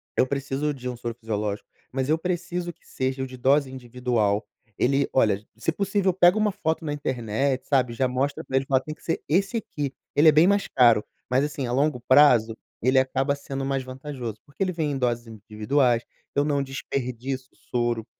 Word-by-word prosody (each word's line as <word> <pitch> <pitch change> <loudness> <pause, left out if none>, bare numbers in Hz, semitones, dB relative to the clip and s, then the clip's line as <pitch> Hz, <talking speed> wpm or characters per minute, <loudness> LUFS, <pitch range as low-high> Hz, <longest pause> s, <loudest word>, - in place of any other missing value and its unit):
eu 130 - +3
preciso 140 +2 -2
de 125 -2 -7
um 125 - -4
soro 120 -1 -5
fisiológico, 105 -3 -3 0.2
mas 130 +1 -2
eu 155 - +4
preciso 175 0 -3
que - - -33
seja 130 0 -2
o - - -4
de 130 0 -10
dose 135 +2 +3
individual." 120 -4 -1 0.3
Ele 140 +2 +2
olha, 105 -5 +2
se - - 0
possível 195 +1 +1
pega 180 +2 +5
uma 215 -1 +2
foto 165 -5 -2
na 150 - -2
internet, 130 -1 -1
sabe? 125 -4 +2
Já 130 +2 +1
mostra 130 +3 -1
para 130 - -5
eles 135 - 0
e - - -37
fala: 130 -1 +3
"Tem 155 - -6
que - - -19
ser 165 - -1
esse 195 +8 +1
aqui. 145 - -4 0.2
Ele 150 +2 +6
é - - +7
bem 155 +4 +5
mais 200 0 +2
caro, 120 -4 +5 0.3
mas 130 +2 +3
assim, 145 -2 -3
a 120 - -3
longo 140 +1 +1
prazo, 125 -5 +6 0.3
ele 130 +3 +4
acaba 135 +2 +1
sendo 135 -1 -5
mais 135 -1 -1
vantajoso, 130 -3 -6
porque 140 +3 -16
ele 185 -1 +2
vem 160 -3 -1
em 140 - -2
doses 120 -2 -1
individuais 115 +3 0
e - - -7
eu - - +3
não 145 -2 +1
desperdiço 130 -1 -4
o - - -29
soro" 120 -2 -2
135 Hz, 210 wpm, -25 LUFS, 125-150 Hz, 0.3 s, é